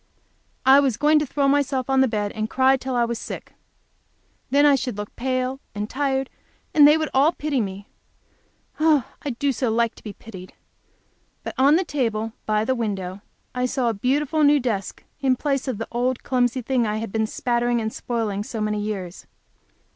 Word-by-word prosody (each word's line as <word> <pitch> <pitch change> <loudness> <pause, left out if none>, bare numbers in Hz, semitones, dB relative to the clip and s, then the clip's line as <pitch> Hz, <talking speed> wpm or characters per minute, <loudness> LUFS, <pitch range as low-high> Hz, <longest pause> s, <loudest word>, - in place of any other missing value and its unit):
I 265 +1 +8
was 265 -6 +1
going 300 +1 +4
to 300 - -2
throw 280 +1 0
myself 275 -2 +1
on 265 -1 +3
the 265 - +4
bed 210 -3 -2
and 215 0 -3
cry 265 +2 +4
till 260 -1 -4
I 240 -1 +3
was 235 -1 -3
sick. - - -8 1.0
Then 285 +2 +4
I 290 - +6
should 250 -5 -1
look 210 0 -7
pale 255 +1 -2 0.2
and 205 0 -3
tired, 270 +1 -1 0.5
and 295 -2 +8
they 300 +1 +6
would 315 -2 -2
all 285 +5 +4
pity 290 -4 -1
me. 200 -1 -6 0.9
I 310 -4 +4 0.3
do 285 - 0 0.2
like 230 +1 +1
so - - -40
to - - -16
be 210 - -7
pitied! 190 -5 -11 0.9
But - - -5
on 275 +3 +5
the 365 +2 +1
table, 225 -7 -2
by 215 0 +1
the 260 - +1
window, 200 -5 -3 0.3
I 250 0 0
saw 250 -2 0
a - - 0
beautiful 285 +8 0
new 290 0 +5
desk 220 -7 -3 0.2
in 265 -2 +2
place 275 +1 -1
of 255 -5 -2
the 225 - -5
old 245 +1 -1
clumsy 250 0 0
thing 245 -2 +1
I 210 0 -1
had 225 -1 -5
been 220 0 0
spattering 240 +1 0
and 220 -1 -3
spoiling 220 -4 -2
so 220 +1 -6
many 210 0 -1
years. 195 -4 -5
250 Hz, 190 wpm, -23 LUFS, 220-275 Hz, 1.0 s, I